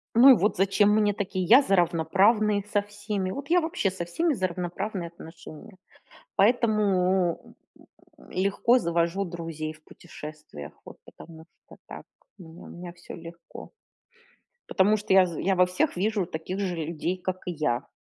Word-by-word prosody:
Ну 255 +4 +8
и - - +10
вот 210 -3 +1
зачем 195 +2 +3
мне 210 -1 +2
такие? 185 -3 -3
Я 250 +9 +7
за 195 -7 +1
равноправные 195 +5 +2
со 205 - +3
всеми. 205 -2 -4
Вот 280 +5 -7
я 355 0 +4
вообще 320 - -1
со 175 -2 -5
всеми 325 - 0
за 185 -5 -1
равноправные 180 +1 -4
отношения. 165 +2 -13 0.6
Поэтому, 195 -5 +1 0.2
м - - -19 0.4
м, - - -19
легко 200 +6 +2
завожу 170 +1 0
друзей 165 -3 -6
в 155 0 -21
путешествиях. 150 - -11
Вот - - -13
потому 160 -1 -14 0.2
что - - -15
так, - - -10 0.3
у - - -12
меня 165 +1 -13
у - - -12
меня 175 0 -9
всё 175 0 -12
легко. 170 0 -11 1.0
Потому 205 +3 +3
что 205 -2 -1
я 190 -1 +7
з 170 -3 -6
я 190 0 +1
во 180 0 +5
всех 185 - -1
вижу 205 -1 0
таких 180 +3 -6
же 185 -3 -2
людей, 165 +3 -3
как 185 0 -4
и - - -1
я. 145 -6 -2
185 Hz, 170 wpm, -26 LUFS, 170-205 Hz, 1.0 s, и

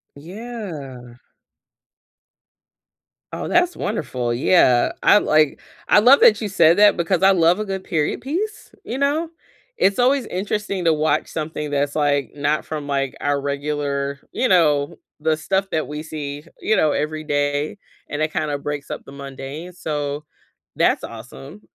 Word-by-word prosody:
Yeah. 155 - -8 2.1
Oh, - - -4
that's 350 0 +2
wonderful. 125 - -2
Yeah, 125 -2 +4
I 205 - +6
like 155 -5 +2 0.3
I - - +6
love 255 +6 +7
that 215 -1 +6
you 215 - -1
said 170 -3 +4
that 205 0 +6
because 175 +2 0
I 195 - +7
love 175 +1 +3
a 215 - -2
good 190 -1 -4
period 160 +3 -1
piece, 360 - -4
you 245 - -5
know, 290 +4 0 0.5
it's 200 - +2
always 255 +1 +3
interesting 195 0 -3
to 165 - +5
watch 155 0 +1
something 150 -1 -4
that's, 145 0 0
like, 145 -2 +1
not 145 +1 0
from, 150 -2 -5
like, 135 -2 -2
our 145 -1 0
regular, 140 0 -2
you 255 - 0
know, 155 -4 +3 0.2
the 160 +1 +1
stuff 190 +5 -1
that 155 - -1
we 150 +1 -6
see, 145 -2 -6 0.2
you 220 - +2
know, 155 - +3
every 155 +2 -2
day, 145 +3 -1 0.3
and 150 +1 -4
it 155 0 0
kinda 150 -2 -1
breaks 145 -1 -5
up - - -5
the - - -13
mundane, 140 +5 -8
so 150 -3 -4 0.5
that's - - +2
awesome. 125 - -10
155 Hz, 155 wpm, -21 LUFS, 145-195 Hz, 2.1 s, love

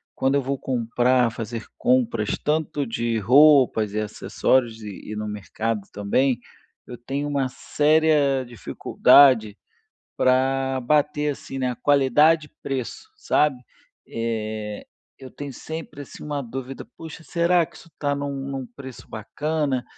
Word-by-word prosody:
quando 135 +1 +1
eu 140 - +2
vou 135 +1 -2
comprar, 125 -1 +1
fazer 115 -1 -6
compras 120 -4 +1
tanto 150 -1 0
de 115 -1 -1
roupas 125 -3 +5
e 105 - -1
acessórios 115 +2 0
e 105 0 -9
e - - -4
no 105 0 -4
mercado 105 +2 -3
também, 120 +5 +1 0.5
eu 125 - -8
tenho 140 +4 -4
uma 140 -2 0
séria 150 -1 +2
dificuldade 120 -1 +4 0.6
pra 130 +1 +1
bater, 150 +3 +1
assim, 135 -1 -8
na 125 -2 -1
qualidade 145 +4 +3
e - - -19
preço, 135 - -5
sabe. 150 - +1 0.5
Eh, 110 -2 -4 0.3
eu 130 -2 -11
tenho 140 -2 -7
sempre 160 0 -7
assim 140 - -11
uma 145 -1 -3
dúvida, 130 +2 -7
"Puxa, 160 0 -10
será 170 +1 +2
que - - -21
isso 165 - -16
tá 145 -1 -1
em 140 - -4
um 140 -1 -4
em - - -5
um 130 -2 -5
preço 130 -3 -10
bacana? 145 +4 -2
130 Hz, 140 wpm, -23 LUFS, 115-145 Hz, 0.6 s, roupas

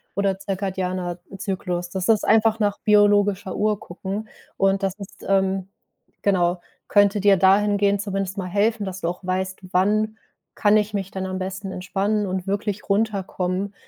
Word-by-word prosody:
oder 195 -1 +1
zirkadianer, 185 -2 -3
äh, 195 - -8
Zyklus. 180 -3 -3
Das 185 0 -3
ist 220 -2 +4
einfach 220 0 +4
nach 205 -2 0
biologischer 205 -2 +3
Uhr 210 -1 +1
gucken 195 +4 -6 0.3
und 195 0 +2
das 195 -1 0
ist 200 - -11
ähm, 190 -1 +1 0.5
genau, 180 -3 +1 0.3
könnte 205 0 +4
dir 200 -1 +5
dahingehend 200 +1 +3
zumindest 195 -1 -3
mal 185 - -3
helfen, 205 +3 +1
dass 190 0 -6
du - - -1
auch 180 +2 -4
weißt: 185 +1 -2
„Wann 215 +4 +2 0.4
kann 205 0 +4
ich 210 0 0
mich 195 -2 -3
dann 190 0 -4
am 185 0 -3
besten 190 +1 -5
entspannen 195 +3 -1
und 185 -1 -3
wirklich 205 +1 -2
runterkommen.“ 200 -2 -1
195 Hz, 160 wpm, -23 LUFS, 185-205 Hz, 0.5 s, dir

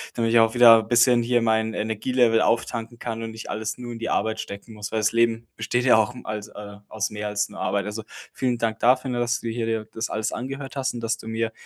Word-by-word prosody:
damit 115 -1 0
ich 115 - +6
auch 115 0 +4
wieder 115 -2 +8
bisschen 120 +2 +4
hier 120 0 +2
mein 110 0 +1
Energielevel 115 +2 +1
auftanken 115 0 -1
kann 115 -1 -4
und 115 0 -5
nicht 110 0 -9
alles 110 0 -3
nur 120 -1 -7
in 115 - -7
die 115 - -3
Arbeit 110 0 0
stecken 110 +1 -8
muss, 105 -1 -7
weil 110 - +1
das 110 0 +2
Leben 115 0 +1
besteht 120 +3 -1
ja 125 -3 +6
auch 110 +3 +1
als 105 -1 -5
äh, 105 -1 -10
aus 110 -1 -2
mehr 105 0 -5
als 105 0 -1
nur - - -11
Arbeit. 100 -1 0
Also 105 +1 -5 0.3
vielen 125 -2 -1
Dank 115 -1 -2
dafür, 130 +2 +3
ne, 120 - -2
dass 120 +1 0
du - - -5
dir 115 0 -2
hier 115 -1 -2
das 115 +1 -4
alles 110 0 -2
angehört 135 +2 -6
hast 135 -1 -1
und 120 - -6
dass 115 -1 -1
du 110 - -11
mir, 110 0 -2
115 Hz, 250 wpm, -24 LUFS, 110-120 Hz, 0.3 s, wieder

